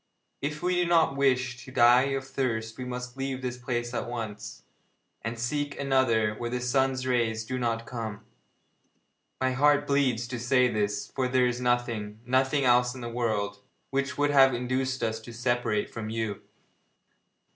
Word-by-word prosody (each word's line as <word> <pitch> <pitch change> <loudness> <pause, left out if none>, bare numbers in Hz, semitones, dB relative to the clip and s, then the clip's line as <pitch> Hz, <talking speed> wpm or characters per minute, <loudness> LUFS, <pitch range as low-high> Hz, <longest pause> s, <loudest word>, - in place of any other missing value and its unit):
If 150 +3 -3
we 180 0 +1
do 175 -1 +2
not 165 -5 +3
wish 130 -2 +1
to 130 - -11
die 120 +1 +6
of 135 0 -7
thirst 115 -5 -2
we 130 - -6
must 125 0 -6
leave 135 -1 -3
this 125 0 -3
place 120 -1 -3
at 120 - -3
once, 110 -4 -6 0.6
and 115 +1 -4
seek 145 +5 -2
another 130 -6 +2
where 120 +2 -4
the 125 +1 -2
sun's 130 +1 +1
rays 115 -3 0
do 130 +2 -3
not 115 -1 -1
come. 110 -3 -6 1.1
My 130 0 +1
heart 145 +2 +3
bleeds 130 -5 +1
to 120 -1 -4
say 125 +1 +3
this, 105 -3 -1
for 130 -2 0
there 125 0 +3
is 125 0 -1
nothing 115 -4 -1
nothing 130 +3 +2
else 125 0 +4
in 130 - -8
the 120 - -4
world 110 -4 -1 0.3
which 140 0 -1
would 145 0 +2
have 135 -2 +6
induced 130 +1 -1
us 110 -1 -1
to 115 +2 -11
separate 120 -3 0
from 110 -2 -6
you.' 110 -2 -3
125 Hz, 170 wpm, -28 LUFS, 115-130 Hz, 1.1 s, die